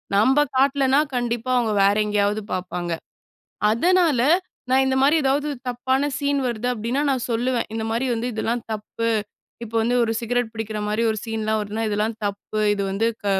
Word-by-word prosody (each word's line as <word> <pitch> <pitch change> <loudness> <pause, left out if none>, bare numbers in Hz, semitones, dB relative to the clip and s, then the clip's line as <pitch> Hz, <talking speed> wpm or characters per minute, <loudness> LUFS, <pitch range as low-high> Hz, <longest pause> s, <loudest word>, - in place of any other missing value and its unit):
நம்ப 260 +8 +4 0.2
காட்லன்னா 270 +1 +3 0.2
கண்டிப்பா 240 0 -2
அவுங்க 235 -3 +1
வேற 200 +1 +4
எங்கயாவது 210 0 +1
பாப்பாங்க. 180 -1 -3 0.8
அதனால 330 +1 +3 0.5
நான் 265 +1 +4
இந்த 265 0 +1
மாரி 290 +4 +5
ஏதாவது 285 +2 +1 0.2
தப்பான 260 +3 0
சீன் 285 -1 0
வருது 240 0 -2
அப்டின்னா, 240 +5 -1
நான் 255 -2 0
சொல்லுவேன், 240 +1 0
"இந்த 220 0 -2
மாரி 235 +4 0
வந்து 230 +2 -2
இதெல்லாம் 230 +1 -1
தப்பு." 220 +2 -3 0.6
இப்போ 230 0 -12
வந்து 245 +2 +1
ஒரு 225 - -1
சிகரெட் 240 -1 -1
பிடிக்கிற 220 -1 -4
மாரி 215 +2 0
ஒரு 215 - -2
சீன்லாம் 220 -1 -1
வருதுனா, 215 +2 -3
"இதெல்லாம் 215 +2 -1
தப்பு, 205 +1 -4
இது 200 - -2
வந்து 220 +4 +1 0.2
க - - -3
230 Hz, 165 wpm, -23 LUFS, 215-260 Hz, 0.8 s, மாரி